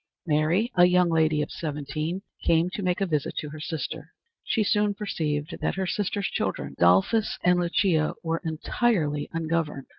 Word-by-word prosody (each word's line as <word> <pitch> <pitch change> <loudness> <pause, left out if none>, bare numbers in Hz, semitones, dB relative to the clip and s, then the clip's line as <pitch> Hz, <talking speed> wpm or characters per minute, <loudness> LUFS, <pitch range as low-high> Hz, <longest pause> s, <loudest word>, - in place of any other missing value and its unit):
Mary, 165 - +1
a 175 -1 +7
young 180 -1 +3
lady 155 -2 +2
of - - -7
seventeen, 155 +2 -4 0.2
came 165 +2 +3
to 205 - -4
make 180 -1 0
a - - +3
visit 155 -5 -1
to 150 - -3
her 155 - -8
sister. 160 0 -5 0.3
She 220 - +1
soon 205 -1 +1
perceived 155 -6 -2
that - - 0
her 190 0 -1
sister's 200 +2 -1
children, 70 -8 -2
Adolphus 95 - +3
and 180 0 +4
Lucia, 170 -2 +1
were 165 0 -1
entirely 160 -2 0
ungoverned. 160 -4 -2
165 Hz, 160 wpm, -26 LUFS, 150-185 Hz, 0.3 s, a